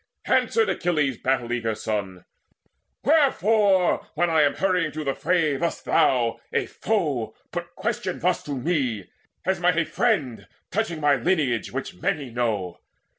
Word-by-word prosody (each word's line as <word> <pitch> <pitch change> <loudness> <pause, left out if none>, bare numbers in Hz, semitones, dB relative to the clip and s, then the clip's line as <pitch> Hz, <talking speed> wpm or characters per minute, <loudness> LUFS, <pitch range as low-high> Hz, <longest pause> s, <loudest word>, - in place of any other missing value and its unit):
Answered 450 -1 +2
Achilles' 150 - 0
battle 125 -2 0
eager 115 -2 -1
son: 95 -4 -4 0.8
"Wherefore, 215 - +3
when 175 +2 +1
I 160 -1 +4
am 145 -1 +3
hurrying 180 -5 +1
to 155 0 -4
the 135 -2 0
fray, 160 -4 +1
Dost 170 - -2
thou, 125 -7 +2
a - - 0
foe, - - -2 0.2
put - - -6
question - - -2
thus - - 0
to 145 - -4
me, 125 - -1 0.4
As 190 0 +1
might 175 -1 +2
a 170 - +2
friend, 155 - 0 0.2
touching 190 -7 -2
my 145 -1 +4
lineage, 130 -4 0
Which 135 +1 -4
many 140 -5 -1
know? 110 -7 -2
150 Hz, 145 wpm, -24 LUFS, 120-180 Hz, 0.8 s, I